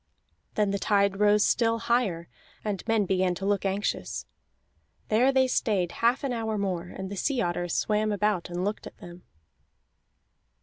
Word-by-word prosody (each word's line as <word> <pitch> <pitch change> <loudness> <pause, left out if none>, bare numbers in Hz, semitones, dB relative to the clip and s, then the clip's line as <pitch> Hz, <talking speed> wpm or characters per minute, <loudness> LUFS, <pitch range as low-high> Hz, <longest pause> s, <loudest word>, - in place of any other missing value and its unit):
Then 210 -2 +2
the 200 - -1
tide 200 -1 +2
rose 210 0 +4
still 230 -1 +2
higher, 225 -8 0 0.4
and 205 -3 -2
men 225 -2 +2
began 185 -1 +1
to 195 - -5
look 200 0 0
anxious. 195 +2 -2 0.8
There 240 +5 +4
they 265 -1 +3
stayed 195 -8 0
half 245 +5 +3
an 270 -3 -1
hour 220 -2 -2
more, 185 -3 -2
and 190 +1 -7
the - - -4
sea 265 +6 0
otters 175 -4 -1
swam 215 0 +1
about 205 -4 0
and 175 +1 -2
looked 205 +1 -3
at - - -13
them. 175 0 -11
205 Hz, 165 wpm, -27 LUFS, 185-225 Hz, 0.8 s, rose